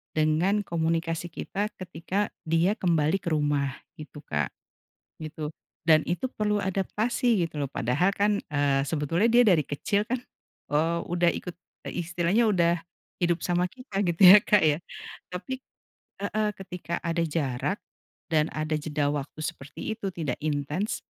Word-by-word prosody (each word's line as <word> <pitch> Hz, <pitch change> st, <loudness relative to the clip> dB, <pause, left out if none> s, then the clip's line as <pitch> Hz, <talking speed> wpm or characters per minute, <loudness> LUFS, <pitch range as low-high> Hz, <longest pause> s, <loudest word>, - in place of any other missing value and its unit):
dengan 160 Hz, +7 st, +2 dB
komunikasi 165 Hz, -1 st, -1 dB
kita 195 Hz, +5 st, -3 dB
ketika 185 Hz, +2 st, -3 dB, 0.2 s
dia 170 Hz, +7 st, +2 dB
kembali 165 Hz, 0 st, +2 dB
ke -, -, -10 dB
rumah, 145 Hz, -2 st, 0 dB, 0.2 s
gitu 150 Hz, -1 st, -10 dB
Kak. 75 Hz, -, -2 dB, 0.7 s
Gitu. 155 Hz, 0 st, -5 dB, 0.3 s
Dan 155 Hz, -1 st, +6 dB
itu 180 Hz, +9 st, 0 dB
perlu 210 Hz, -4 st, 0 dB
adaptasi, 205 Hz, +2 st, +1 dB
gitu 150 Hz, -3 st, -5 dB
loh. 140 Hz, -, -3 dB
Padahal 135 Hz, +12 st, +1 dB
kan, 205 Hz, +1 st, +1 dB
eee, 145 Hz, -2 st, +2 dB
sebetulnya 165 Hz, +9 st, +1 dB
dia 240 Hz, +1 st, +6 dB
dari 175 Hz, -7 st, +5 dB
kecil 145 Hz, +9 st, -1 dB
kan, 245 Hz, +4 st, -2 dB, 0.5 s
eee, 160 Hz, +4 st, +1 dB
udah 175 Hz, 0 st, +2 dB
ikut, 180 Hz, -2 st, -6 dB, 0.3 s
e -, -, -6 dB
istilahnya 175 Hz, +6 st, +1 dB
udah 175 Hz, -5 st, +3 dB, 0.4 s
hidup 175 Hz, -1 st, +1 dB
sama 180 Hz, 0 st, +1 dB
kita, 205 Hz, -1 st, -3 dB
gitu 170 Hz, 0 st, -1 dB
ya 190 Hz, +2 st, +11 dB
Kak 210 Hz, -2 st, +5 dB
ya. 150 Hz, -2 st, +3 dB, 0.6 s
Tapi 180 Hz, +9 st, -4 dB, 0.7 s
heeh, 215 Hz, +1 st, 0 dB
ketika 180 Hz, -3 st, -5 dB
ada 170 Hz, 0 st, 0 dB
jarak, 145 Hz, +4 st, -1 dB, 0.6 s
dan 155 Hz, 0 st, +3 dB
ada 155 Hz, 0 st, -1 dB
jeda 150 Hz, -1 st, -1 dB
waktu 145 Hz, +1 st, -5 dB
seperti 150 Hz, +5 st, -5 dB
itu, 215 Hz, -3 st, -4 dB
tidak 160 Hz, -8 st, -3 dB
intens, 155 Hz, -, -1 dB
170 Hz, 145 wpm, -27 LUFS, 155-195 Hz, 0.7 s, ya